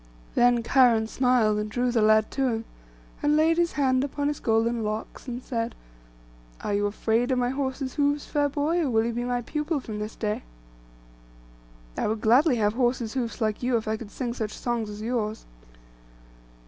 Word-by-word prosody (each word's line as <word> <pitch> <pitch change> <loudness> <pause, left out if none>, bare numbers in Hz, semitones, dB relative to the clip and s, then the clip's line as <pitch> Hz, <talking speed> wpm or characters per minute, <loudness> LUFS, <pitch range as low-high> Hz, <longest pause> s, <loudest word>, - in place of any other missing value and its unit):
Then 240 -1 +4
Cheiron 235 -3 +4
smiled, 235 -4 +2
and 210 0 -3
drew 245 +3 0
the 235 -2 +2
lad 215 0 +4
to 270 -1 0
him, 225 -2 -2 0.6
and 295 0 +3
laid 325 +1 +3
his 340 -1 +1
hand 260 -2 +2
upon 285 +1 -1
his 295 - -3
golden 225 +1 +1
locks, 215 +5 -5
and 245 0 -5
said, 230 -1 -3 0.9
'Are 205 - -2
you 205 0 +1
afraid 225 +4 0
of 260 - +1
my 245 0 +1
horse's 265 -1 -3
hoofs, 285 0 +1
fair 290 -1 0
boy, 300 +5 0
or 300 - 0
will 225 -2 +2
you 235 - -1
be 240 +1 -2
my 245 0 -1
pupil 300 +4 -2
from 215 -5 -6
this 210 +1 -5
day?' 210 -1 -2 1.6
'I - - 0
would 215 0 -2
gladly 255 +6 +4
have 210 -2 +1
horse's 240 -2 0
hoofs 245 -2 -3
like 215 -1 0
you, 245 -1 +2
if 220 - -5
I 220 - 0
could 220 -1 -8
sing 240 +1 -4
such 215 -3 -4
songs 235 -3 -2
as 210 +1 -7
yours. 220 -2 -2
240 Hz, 190 wpm, -26 LUFS, 220-265 Hz, 1.6 s, Then